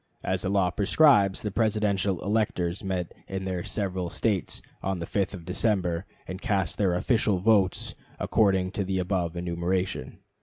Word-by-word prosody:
As - - 0
the - - -1
law 95 -2 +2
prescribes, 100 -2 +4
the 105 - -2
Presidential 100 -3 +1
electors 100 -4 0
met 95 -3 -3
in 95 0 -4
their 90 -2 -2
several 95 -4 -2
States 100 -1 -1 0.2
on 95 -1 -1
the 85 - -4
5th 100 +2 -1
of 85 -3 -10
December, 90 -2 0 0.2
and 95 +1 -6
cast 100 -8 0
their 95 -4 +2
official 110 0 +2
votes 95 -1 +2 0.3
according 95 -3 +2
to 100 - -2
the 95 0 -1
above 90 -2 -1
enumeration. 90 -2 -2
95 Hz, 155 wpm, -27 LUFS, 90-100 Hz, 0.3 s, prescribes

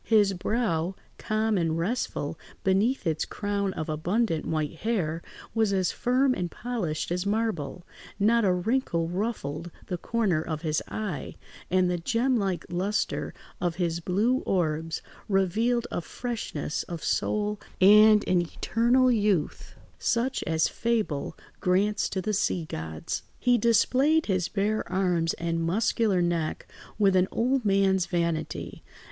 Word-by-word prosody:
His 210 -3 +4
brow, 190 -3 -1 0.2
calm 215 -1 0
and 165 -1 0
restful 210 +10 -2 0.2
beneath 200 +5 +2
its 160 -2 0
crown 200 -1 -2
of 155 - -4
abundant 165 +3 0
white 155 0 -2
hair, 170 -6 -1 0.3
was 220 -3 +2
as 190 -2 +1
firm 255 +2 +2
and 180 -7 -2
polished 190 -12 -3
as 180 +2 -1
marble; 200 -7 -2 0.3
not 230 +3 +4
a 190 - +4
wrinkle 180 -3 0
ruffled 175 -5 -3 0.2
the 180 -2 -4
corner 205 -9 0
of 155 0 -4
his 155 -1 0
eye, 200 -10 -4 0.3
and 185 0 +3
the 180 -1 -1
gem 240 +8 +1
like 195 -5 -1
lustre 190 +4 -1 0.3
of 175 -2 0
his 170 -1 -1
blue 205 +9 +1
orbs 165 - -1 0.3
revealed 220 +5 +2
a - - -2
freshness 210 - -4
of 170 -2 -7
soul 210 0 0 0.2
and 210 +2 +7
an 180 -1 +3
eternal 240 +8 +2
youth 205 -8 0 0.2
such 245 +3 0
as 160 0 +2
fable 220 -11 -1 0.2
grants 200 +3 +1
to 190 - -3
the 215 - -1
sea 185 -4 0
gods. 80 - -5 0.2
He 245 0 +3
displayed 260 +8 +3
his 185 -4 0
bare 210 +1 0
arms 180 -3 +1
and 165 0 -2
muscular 195 +1 +1
neck 170 -2 -1 0.3
with 200 -3 +4
an 185 0 +4
old 255 +2 +1
man's 195 -2 +3
vanity. 170 -2 -2
190 Hz, 140 wpm, -27 LUFS, 170-225 Hz, 0.3 s, and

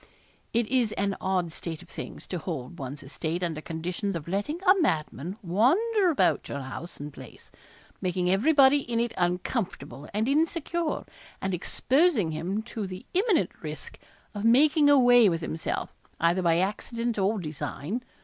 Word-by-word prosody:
It 235 0 +2
is 245 -4 +2
an 200 -1 -1
odd 180 -3 0
state 160 -1 -6
of - - -18
things - - -8
to 180 - -4
hold 155 -3 -5
one's 140 +2 -6
estate 160 +5 -3
under 160 -3 -2
condition 175 +5 -3
of 155 - -9
letting 205 - -2
a 375 - +7
madman 165 - -1
wander 350 - +3
about 310 - +2
your 140 - -4
house 135 +6 -8
and 145 0 -7
place, - - -13 0.5
making 180 -1 0
everybody 275 - +5
in 240 -4 -2
it 235 0 0
uncomfortable 175 - -2
and 215 +3 0
insecure 325 +2 0 0.3
and 190 0 -2
exposing 255 - +2
him 180 +7 -2
to 220 -3 -5
the 185 0 -8
imminent 375 - +2
risk 150 -2 -7 0.3
of 205 -1 -5
making 290 +6 +5
away 245 -5 +7
with 165 -1 -1
himself, 160 0 -3 0.3
either 170 +3 +3
by 165 -2 +3
accident 230 +4 -1
or 200 +3 +2
design. 160 - -4
195 Hz, 155 wpm, -27 LUFS, 170-250 Hz, 0.5 s, a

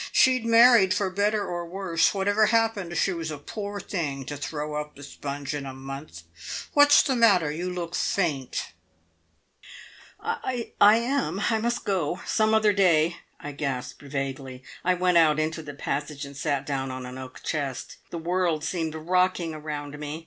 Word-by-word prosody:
She'd 255 -3 +4
married 230 -4 +6
for 195 -2 0
better 205 +2 +1
or 175 -2 -3
worse. 175 -2 +1
Whatever 205 +2 +2
happened, 215 -6 +1
she 195 - +2
was 165 -2 -4
a 155 - -5
poor 205 +7 -6
thing 145 -9 -3
to 145 - -5
throw 150 +1 -4
up 150 0 -4
the 145 - -12
sponge 140 0 -5
in 145 -1 -3
a 135 -1 -7
month. 135 - -8 0.5
What's 290 0 +7
the 265 - 0
matter? 195 -10 +4
You 175 +4 -3
look 175 -1 -5
faint." 150 -12 -1 1.5
"I 245 -2 -3
I 205 +1 +8
am! 240 -4 -1
I 220 - +2
must 235 +2 -2
go. 180 -3 -1
Some 220 0 +2
other 215 -1 +4
day," 170 -4 +3 0.2
I 145 - -6
gasped 135 -3 -4
vaguely. 135 -2 -5 0.2
I 185 +1 +3
went 180 -1 +3
out 155 -2 +4
into 155 +1 -1
the 145 -2 -9
passage, 145 0 -3
and 140 0 -11
sat 140 -1 -1
down 135 -2 -2
on 130 0 -6
an 125 +1 -8
oak 130 0 -10
chest. 140 -5 -3
The 170 - -5
world 170 -2 0
seemed 160 -2 -2
rocking 180 0 +1
around 150 -1 -6
me. 150 +1 -5
165 Hz, 170 wpm, -26 LUFS, 145-200 Hz, 1.5 s, I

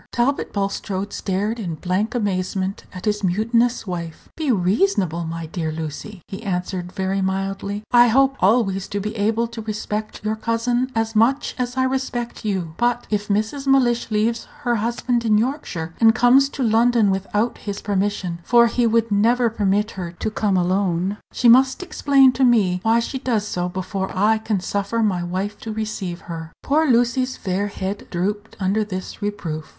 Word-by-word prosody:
Talbot 255 +4 0
Bulstrode 200 0 -3
stared 205 +4 -2
in 175 -7 -3
blank 190 +9 -1
amazement 190 -2 -2
at 185 - -8
his 210 -1 0
mutinous 230 +7 +1
wife. 170 -4 -6
"Be 310 -4 0
reasonable, 185 - +1
my 165 0 -5
dear 160 -1 -3
Lucy," 160 +5 -6
he 195 - -7
answered 180 -2 -3
very 190 0 -1
mildly; 195 +2 -2
"I 240 0 +7
hope 270 +3 +3
always 195 -2 +2
to 205 - -3
be 210 +2 -4
able 220 +2 +1
to 230 -1 -7
respect 215 0 -4
your 215 +1 0
cousin 240 +3 -1
as 225 0 -1
much 240 +6 +2
as 250 +1 -2
I 260 - +3
respect 260 -2 -2
you. 190 -6 -2
But 240 0 +1
if 210 -1 -1
Mrs. 220 +7 -1
Mellish 245 -4 +3
leaves 225 +2 0
her 240 -4 +1
husband 235 +2 -1
in 215 -2 +3
Yorkshire, 215 - -2
and 225 0 +6
comes 260 +3 +5
to 275 - -3
London 230 -2 +3
without 205 +4 -1
his 200 -1 -5
permission 195 -3 -1
for 235 +3 +5
he 235 +1 +1
would 230 0 +1
never 230 +3 +3
permit 210 0 +1
her 175 -3 -6
to 215 - -3
come 205 -3 +1
alone 185 +1 0
she 245 - +1
must 260 +7 +5
explain 275 -6 +4
to 255 +2 0
me 210 -8 +3
why 225 +3 +3
she 260 +3 -3
does 225 -5 -1
so 180 -2 -2
before 190 +1 -3
I 215 +3 +3
can 215 -3 -1
suffer 200 +4 -1
my 190 -5 +1
wife 190 +4 -3
to 225 - -6
receive 210 -5 -4
her." 165 -1 -7
Poor 310 +2 +2
Lucy's 245 +2 +2
fair 190 +1 -1
head 200 0 -5
drooped 205 +4 -3
under 200 +3 +1
this 185 0 -6
reproof. 170 -7 -4
210 Hz, 175 wpm, -21 LUFS, 190-235 Hz, -, I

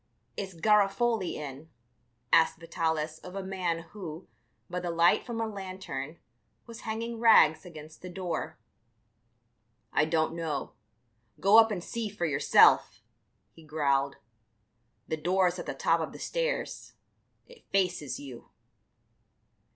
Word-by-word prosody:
"Is 190 -2 -5
Garofoli 210 +2 +2
in?" 145 +1 -8 0.6
asked 165 -1 +5
Vitalis 160 -2 -2
of 180 +1 -11
a 195 - -4
man 180 -3 -2
who, 180 -4 -8 0.4
by 180 0 -3
the 175 -1 -4
light 170 0 +3
from 235 -2 -5
a 225 - 0
lantern, 185 -8 -6 0.5
was 230 -1 -10
hanging 230 +1 -4
rags 180 -8 +5
against 155 -2 -12
the 180 - -8
door. 175 -3 -4 1.4
"I - - +3
don't 160 0 0
know; 160 -5 -4 0.7
go 205 +4 +7
up 225 0 +6
and 190 -5 -3
see 230 0 -4
for 195 -4 -3
yourself," 140 -6 +4 0.5
he 165 - -17
growled; 140 -3 0 0.9
"the 160 - -2
door's 180 +2 +1
at - - -7
the - - -4
top - - +2
of - - -4
the - - -10
stairs; - - -3 0.5
it 485 0 -18
faces 180 -9 0
you." 130 -4 -10
175 Hz, 130 wpm, -29 LUFS, 155-200 Hz, 1.4 s, go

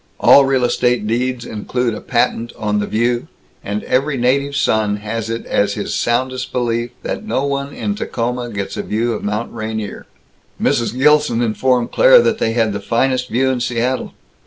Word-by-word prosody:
All 140 - +7
real 135 -2 +1
estate 120 -2 +1
deeds 120 +2 -1
include 120 +2 -2
a - - -6
patent 120 -1 0
on 105 -1 -1
the 105 - -2
View, 120 +2 0 0.4
and 105 +1 -3
every 135 +2 0
native 140 +3 +1
son 110 -6 +1
has 110 +2 -4
it 115 0 -4
as - - +1
his - - -3
soundest 130 +2 -1
belief 120 -1 -1
that - - -4
no 180 -11 -1
one 140 0 -2
in 205 - -3
Tacoma 125 - -3
gets 100 -3 -4
a - - -2
View 115 +2 -1
of 105 - -5
Mount 105 +3 -3
Rainier. 110 -2 -5 0.5
Mrs. 115 +1 0
Gilson 150 -4 +3
informed 120 +2 +1
Claire - - +7
that 225 - +1
they 115 - 0
had 115 -3 +1
the 100 - -3
finest 125 +4 0
View 130 +3 +1
in 130 - -1
Seattle. 120 +1 -1
120 Hz, 180 wpm, -18 LUFS, 110-130 Hz, 0.5 s, All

